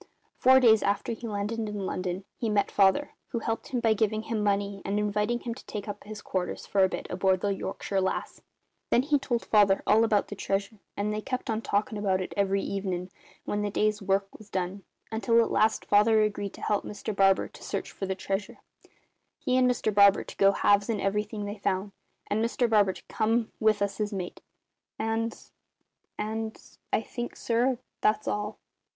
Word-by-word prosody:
Four 260 +1 +7
days 225 -4 +6
after 200 +3 0
he 230 +1 -5
landed 210 +2 -2
in 210 -3 -3
London 185 +1 -3
he 230 - -1
met 210 -1 +1
Father, 200 +9 +3 0.2
who 245 - -4
helped 225 0 -3
him 250 - -1
by 225 -1 +4
giving 215 0 0
him 225 -1 -2
money 200 -1 0
and 200 +1 -1
inviting 210 +3 0
him 235 - -4
to 250 - -12
take 210 0 -5
up 205 0 -6
his 210 0 -8
quarters, 180 -1 -3
for 195 -1 +2
a 190 - +4
bit, - - -5
aboard 185 0 +2
the 200 -1 +1
Yorkshire 195 0 -2
Lass. 190 - -2 0.5
Then 245 - +4
he 290 0 +2
told 245 -4 -2
Father 205 -2 +4
all 220 +2 +5
about 215 -3 +2
the 205 - -5
treasure, 200 +2 -2 0.2
and 205 +1 -1
they 215 - -2
kept 255 +1 -3
on 220 0 -1
talkin' 210 0 -1
about 190 -2 +1
it 185 - -4
every 195 -1 +1
evenin', 185 -2 -3 0.3
when 205 - -1
the 205 - -1
day's 210 +1 +1
work 195 0 +1
was 215 -1 -14
done, 185 +1 -3 0.3
until 230 +1 +3
at 230 - +2
last 220 0 +2
Father 215 +1 +5
agreed 205 -2 -2
to - - -13
help 210 - +1
Mr 210 0 -5
Barber 195 -1 +4
to - - -15
search - - -4
for 195 - -5
the 190 - -1
treasure, 195 +1 -3 0.8
he 255 - 0
and 255 -1 +4
Mr 235 -3 0
Barber 200 -1 +6
to - - -11
go 195 0 +6
halves 200 +1 +3
in 220 -3 0
everything 210 +1 -1
they 205 +1 -6
found, 200 0 -1 0.3
and 215 +2 0
Mr 240 +1 +1
Barber 205 -4 +4
to - - -13
come 225 +1 0
with 215 -2 +3
us 200 +1 -3
as 210 0 -1
mate. 185 -3 -5 0.6
And 225 +1 -1 0.8
and 220 +1 -3 0.3
I 220 - +1
think, 240 +2 -6
sir, 240 +2 +1 0.2
that's 215 0 +2
all." 210 +1 -2
210 Hz, 200 wpm, -28 LUFS, 200-225 Hz, 0.8 s, Four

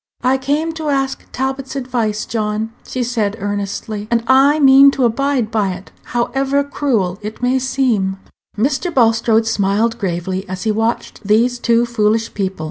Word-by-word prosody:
"I 260 +2 +2
came 295 +5 -1
to 320 -2 -4
ask 270 -1 -1
Talbot's 265 +1 -3
advice, 240 -5 -2
John," 215 0 -2 0.2
she 255 - -2
said, 220 -4 -1
earnestly, 205 +1 -4
"and 235 -1 +1
I 270 +4 +5
mean 275 0 +7
to 260 - +3
abide 255 -1 0
by 200 -4 0
it, 180 - -11
however 270 +3 0
cruel 230 -10 -1
it 215 +3 -7
may 255 +1 +2
seem." 240 -8 0 0.4
Mr. 270 - 0
Bulstrode 225 -3 +3
smiled 220 +2 0
gravely 185 0 -3
as 185 0 -5
he 220 - +1
watched 225 +2 -2
these 230 +4 +2
two 235 0 +2
foolish 225 -1 0
people. 190 -3 -3
230 Hz, 155 wpm, -17 LUFS, 210-265 Hz, 0.4 s, mean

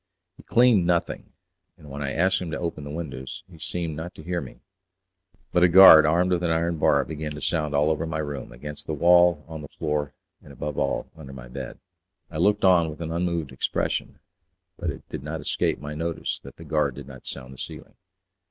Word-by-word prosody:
He - - -15
cleaned 115 -7 +4
nothing, 85 -1 -1 0.5
and 75 - -15
when 70 +1 -6
I 70 -1 -2
asked 95 +5 +2
him 90 - -4
to 80 - -3
open 85 -4 -4
the - - -7
windows 75 +3 -6
he 85 -4 -16
seemed 85 -1 -4
not 85 +3 -7
to 80 - -11
hear 90 +1 -2
me; 65 - -11 0.9
but 90 - +2
a 90 - +7
guard 85 -4 +9
armed 90 +4 +2
with 90 -1 +1
an 85 - 0
iron 85 0 0
bar - - +3
began 75 -1 -5
to 75 - -7
sound 75 -2 -1
all 75 +2 +3
over 80 +1 -2
my 75 -1 -3
room, 75 -3 -5
against 75 +4 -8
the 80 - -2
wall, 85 0 +5
on 80 -1 -7
the 75 - -8
floor, 75 -1 -3 0.3
and - - -14
above 75 -1 -4
all 70 - -1
under 70 -4 -11
my 60 -2 -10
bed. 65 0 -7 0.5
I 80 - -5
looked 100 +4 +2
on 85 -3 +5
with 75 - -9
an 80 -1 -4
unmoved 85 -3 -1
expression, - - -2 0.6
but - - -3
it - - -7
did 75 - -5
not 75 +3 -5
escape - - 0
my 75 +2 -6
notice 85 +2 -3
that - - -12
the - - -12
guard 75 -4 0
did 70 -1 -9
not 65 -2 -12
sound 65 0 -7
the 65 - -14
ceiling. - - -8
80 Hz, 215 wpm, -25 LUFS, 75-85 Hz, 0.9 s, guard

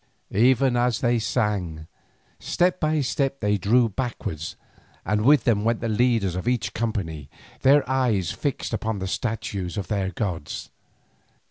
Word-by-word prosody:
Ever 125 +4 +4
as 120 -2 +1
they 120 -1 +2
sang, 100 -9 -1 0.5
step 180 +1 +1
by 155 -1 +1
step 135 +1 -1
they 105 -1 +1
drew 115 +6 +4
backwards, 100 - -4 0.5
and 105 +3 +1
with 140 -1 +5
them 105 -3 +2
went 115 0 +1
the 115 - -2
leaders 110 -4 +2
of 95 +5 -4
each 125 -1 0
company, 90 - -3 0.3
their 140 +1 +5
eyes 120 -9 +1
fixed 135 +4 -3
upon 110 0 -2
the 95 0 -3
statues 105 -5 -3
of 95 -4 -4
their 100 -3 0
gods. 90 -5 -4
110 Hz, 145 wpm, -24 LUFS, 95-125 Hz, 0.5 s, with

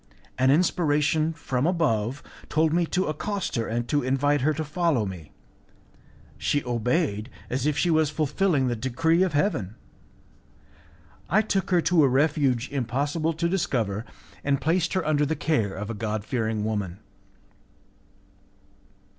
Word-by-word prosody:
An 130 +1 +4
inspiration 155 0 +2
from 140 -4 -2
above 135 - 0 0.3
told 155 0 +2
me 170 0 +2
to 185 +3 0
accost 195 +6 -3
her 115 -2 -1
and 120 +1 -2
to 145 +4 +1
invite 135 +2 +1
her 150 +4 +3
to 155 +1 -2
follow 155 - +1
me. 90 -6 -8 1.1
She 140 - 0
obeyed, 120 - 0 0.2
as 130 +3 0
if 150 - 0
she 175 - +2
was 155 -2 +3
fulfilling 155 0 +1
the 120 - 0
decree 150 +9 +1
of 185 -4 +2
Heaven, 145 - 0 1.5
I 215 +4 +4
took 195 -3 -1
her 180 -2 +3
to 170 -1 +3
a - - +5
refuge 135 -2 +2
impossible 145 +5 -1
to 165 +2 -1
discover, 115 - -1 0.4
and 140 -1 +1
placed 170 +4 +1
her 185 -3 0
under 150 -1 +2
the 155 +2 0
care 130 -10 0
of 105 +3 -5
a - - -3
God 110 -1 -3
fearing 110 -4 -1
woman." 100 -5 -2
145 Hz, 145 wpm, -25 LUFS, 120-160 Hz, 1.5 s, a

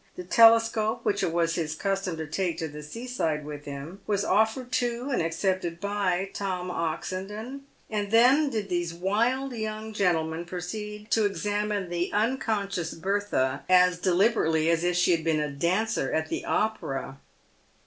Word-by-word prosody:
The 180 - -6
telescope 225 +1 +5
which 200 - +1
it - - 0
was 165 0 +1
his 160 -2 -2
custom 195 -2 -2
to 160 - -4
take 175 +3 -2
to 160 - -2
the 150 0 -9
sea 230 +12 -8
side 160 - -1
with 145 -1 -7
him 145 +7 -7
was 200 -1 0
offered 220 +5 +1
to 245 +3 -1
and 250 - +1
accepted 170 +1 -1
by 195 -2 -1
Tom 185 -2 -3
Oxen 180 +3 -3
don, 225 +7 -7 0.3
and 205 -2 -2
then 255 +7 +5
did 215 -6 -3
these 175 -2 -2
wild 235 +9 0
young 220 -1 -4
gentlemen 170 -4 0
proceed 210 +4 -6
to 220 -2 +3
examine 205 -1 -1
the 175 0 -2
unconscious 210 -6 -1
Bertha 190 -7 -1
as 180 -1 +5
deliberately 175 -4 +2
as 165 0 +1
if 175 0 +1
she 180 0 +4
had 165 -2 +1
been 160 -1 +1
a 150 -1 -2
dancer 175 +2 0
at 160 0 -1
the - - -3
Opera. 135 -11 -2
190 Hz, 165 wpm, -27 LUFS, 165-215 Hz, 0.3 s, telescope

